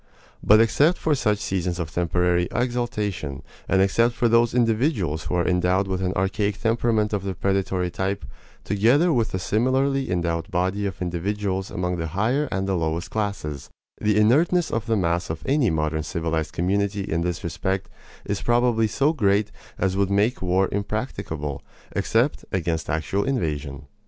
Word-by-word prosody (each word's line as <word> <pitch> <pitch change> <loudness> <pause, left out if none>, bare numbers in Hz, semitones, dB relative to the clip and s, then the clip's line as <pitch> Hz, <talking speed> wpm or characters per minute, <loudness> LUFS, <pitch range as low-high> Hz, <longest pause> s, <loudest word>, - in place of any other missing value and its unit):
But 105 +1 +6
except 145 +9 +4
for 160 - +1
such 105 -7 +1
seasons 90 -3 -2
of 85 -3 -4
temporary 90 +1 +1
exaltation, 105 - -2 0.3
and 95 0 +4
except 115 +5 +2
for 120 - +2
those 115 +1 +3
individuals 110 - +1
who 85 - -2
are 85 -1 +1
endowed 90 +2 +2
with 95 -1 -2
an 90 -1 0
archaic 100 +2 -1
temperament 115 -2 +1
of 100 - 0
the 95 -1 -3
predatory 95 -2 0
type, 95 -4 -2 0.4
together 120 - +3
with 115 -4 +1
the - - -3
similarly 130 +7 +1
endowed 85 -2 -1
body 95 +3 0
of 95 -1 -5
individuals 95 +2 -2
among 90 0 -2
the 80 -1 -3
higher 130 +8 +1
and 95 +1 -1
the 95 - 0
lowest 80 0 -2
classes, 100 -10 -3 0.3
the 105 0 +2
inertness 160 +11 +3
of 115 +1 -2
the 115 -1 +2
mass 85 -2 0
of 80 0 -5
any 135 -4 +2
modern 80 -1 0
civilized 80 0 -2
community 100 +3 0
in 85 -4 -1
this 85 -1 -2
respect 95 +3 -2 0.4
is 100 -1 -2
probably 120 0 +2
so 140 +9 +1
great 105 -5 +1 0.3
as 95 0 0
would 100 -1 +1
make 105 +5 +1
war 95 +1 +2
impracticable, 100 - -3 0.3
except 120 +6 +1
against 85 -3 -1
actual 80 +6 0
invasion. 75 - -2
95 Hz, 160 wpm, -24 LUFS, 85-115 Hz, 0.4 s, But